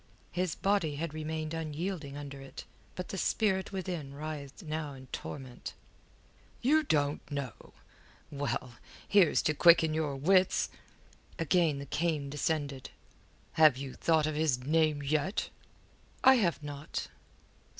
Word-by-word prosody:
His 180 -2 -1
body 195 -7 +1
had 155 +1 -3
remained 155 0 -3
unyielding 160 -1 -4
under 140 -1 -7
it, 135 - -9 0.3
but 180 - -5
the 195 - -3
spirit 190 -2 +1
within 175 -8 -4
writhed 150 +1 -6
now 155 -2 -3
in 130 -1 -11
torment. 130 -3 -7 0.9
"You 305 +5 +5
don't 145 - +1
know? 140 -6 -6 0.6
Well, 140 -4 -3 0.3
here's 195 -6 +5
to 155 - +2
quicken 165 0 +6
your 155 -3 -1
wits." 185 +7 +3 0.7
Again 165 -2 +2
the 140 - -6
cane 150 -1 -1
descended. 145 -2 -2 0.7
"Have 150 -5 +8
you 135 -1 -6
thought 160 -2 +2
of 155 - -1
his 150 -5 +1
name 155 0 +2
yet?" 155 +7 0 0.7
"I 265 0 +8
have 175 -8 +1
not." 145 0 -5
155 Hz, 130 wpm, -31 LUFS, 140-170 Hz, 0.9 s, Have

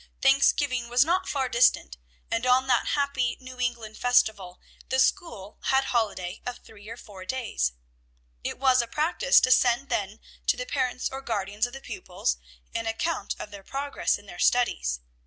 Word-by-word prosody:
Thanksgiving 270 -2 +3
was 245 +3 +4
not 355 +3 0
far 270 -2 0
distant, 235 - +3 0.4
and 230 +1 0
on 255 +1 +4
that 250 -2 +2
happy 280 -4 0
New 255 -1 -11
England 235 -3 -3
festival, 215 -7 +2 0.3
the 260 - +1
school 215 - 0
had 265 0 +3
a - - -6
holiday 205 -5 -1
of 245 0 -5
three 210 -1 -15
or 230 - -7
four 195 -5 -11
days. 185 - -2 0.7
It - - -3
was 260 -2 +4
a 235 - -5
practice 335 - +3
to 255 - +2
send 255 +2 +3
then 205 +1 -2 0.3
to - - +3
the - - -4
parents 255 - -1
or 270 0 -6
guardians 210 -2 -1
of 245 - -14
the 270 - -8
pupils 180 - -3 0.4
an 230 0 -2
account 315 +9 -2
of 210 - -8
their 200 -1 -9
progress 275 +7 -1
in 205 - -17
their 175 -3 -11
studies. 60 - +1
245 Hz, 175 wpm, -26 LUFS, 210-270 Hz, 0.7 s, was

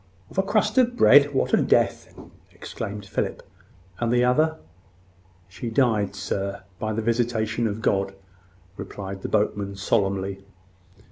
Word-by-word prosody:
"Of - - -2
a - - +6
crust 215 +3 +1
of 245 -1 +2
bread! 145 - +6
What 135 - 0
a - - +6
death!" - - +1 0.4
exclaimed 105 0 -7
Philip. 100 - -3 0.5
"And 120 -1 0
the 120 0 +3
other?" 155 +6 +2 0.9
"She 105 +5 -6
died, 110 -5 +1
sir, 100 +1 -3 0.2
by 110 - -2
the 110 +1 -2
visitation 115 -1 0
of 110 +1 -5
God," 95 0 0 0.6
replied 95 -1 -7
the - - -4
boatman, 105 -2 0
solemnly. 95 -1 -1
110 Hz, 135 wpm, -24 LUFS, 100-125 Hz, 0.9 s, a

